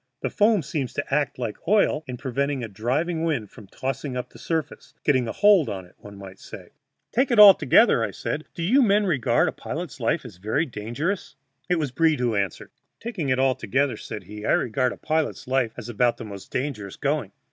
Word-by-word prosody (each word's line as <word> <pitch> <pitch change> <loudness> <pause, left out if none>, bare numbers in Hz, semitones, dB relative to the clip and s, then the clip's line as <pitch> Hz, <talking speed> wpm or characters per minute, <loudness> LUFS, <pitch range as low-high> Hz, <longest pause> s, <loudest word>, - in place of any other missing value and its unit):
The - - -1
foam 210 -4 +3
seems 140 -3 -3
to - - -4
act 145 -1 0
like 120 -4 -4
oil 195 -6 +3
in 125 -1 -5
preventing 135 +1 -2
a - - -3
driving 140 - -1
wind 135 -11 -1
from 105 - -13
tossing 135 +2 -4
up 125 - -5
the - - -15
surface 160 -2 -4
getting 130 -5 +2
a - - -2
hold 205 -6 +4
on 95 -2 -5
it, 90 - -21
one 100 -1 -12
might 95 -1 -11
say. - - -11 0.4
"Taking 255 +1 +1
it 225 - +3
altogether," 205 - +7
I - - +1
asked, - - -12 0.3
"do 170 - -4
you 250 +11 +4
men 210 -3 +3
regard 150 - +2
a - - 0
pilot's - - -6
life - - 0
as - - -10
very 110 - 0
dangerous?" 135 - -4 0.3
It 180 - +3
was 150 -5 -2
Breed 155 +2 +2
who 120 -2 +1
answered: 100 -4 -3 0.3
"Taking 205 - -4
it 130 - +2
altogether," 130 0 +1
said 105 -3 -8
he, 105 +3 -10
"I - - +2
regard 125 +2 +1
a - - -8
pilot's 155 -4 -2
life 130 -3 +1
as 120 -2 -7
about 120 +1 +1
the 115 - -7
most 100 -2 -9
dangerous 125 -8 -4
going. - - -1
135 Hz, 210 wpm, -24 LUFS, 115-165 Hz, 0.4 s, altogether